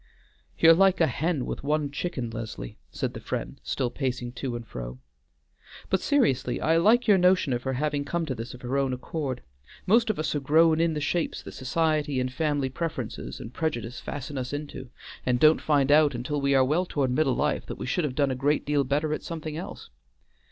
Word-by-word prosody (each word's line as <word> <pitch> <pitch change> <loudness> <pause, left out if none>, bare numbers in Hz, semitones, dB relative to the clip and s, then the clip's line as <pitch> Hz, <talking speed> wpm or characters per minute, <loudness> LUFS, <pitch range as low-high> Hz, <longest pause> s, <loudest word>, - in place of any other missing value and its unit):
"You're 165 0 +8
like 190 +2 +4
a 165 - +5
hen 155 +1 -1
with - - -5
one 150 0 0
chicken, 140 -6 -3
Leslie," 110 - -7
said - - -3
the - - -6
friend, - - -5
still 125 -2 -2
pacing 125 -2 -3
to 125 -1 -4
and 120 -1 -6
fro. 60 - -7 0.9
"But 190 - +3
seriously, 135 - +1
I 160 +1 +3
like 225 +9 +4
your 200 -3 +6
notion 180 -6 +3
of 120 - -1
her 130 +1 -2
having 145 +2 -1
come 170 +3 -2
to 140 - -2
this 120 0 -7
of 125 - -14
her 130 +3 0
own 135 -2 0
accord. 130 0 -4 0.4
Most 230 +4 +4
of 215 - 0
us 155 - -1
are 150 - 0
grown 160 +3 +4
in 165 -1 +1
the 150 - -2
shapes 165 +3 -1
that - - -8
society 150 0 0
and 125 0 -2
family 145 -2 0
preference 130 -4 -4
and 115 - -8
prejudice 125 -7 -3
fasten 145 0 -5
us 125 +2 -4
into, 145 -3 -6 0.3
and 125 -1 +1
don't 155 +3 +5
find 145 -2 +2
out 150 -2 +5
until 140 +4 -2
we 140 0 +2
are 130 -1 +5
well 165 +7 +1
toward 135 -6 0
middle 135 0 +2
life - - 0
that - - -6
we - - -5
should 145 +7 0
have 140 -4 -2
done 140 -2 +2
a - - -1
great 145 +4 +1
deal 145 -1 +2
better 150 +3 0
at - - -3
something 160 -2 -5
else. 160 - -8
145 Hz, 215 wpm, -27 LUFS, 130-160 Hz, 0.9 s, You're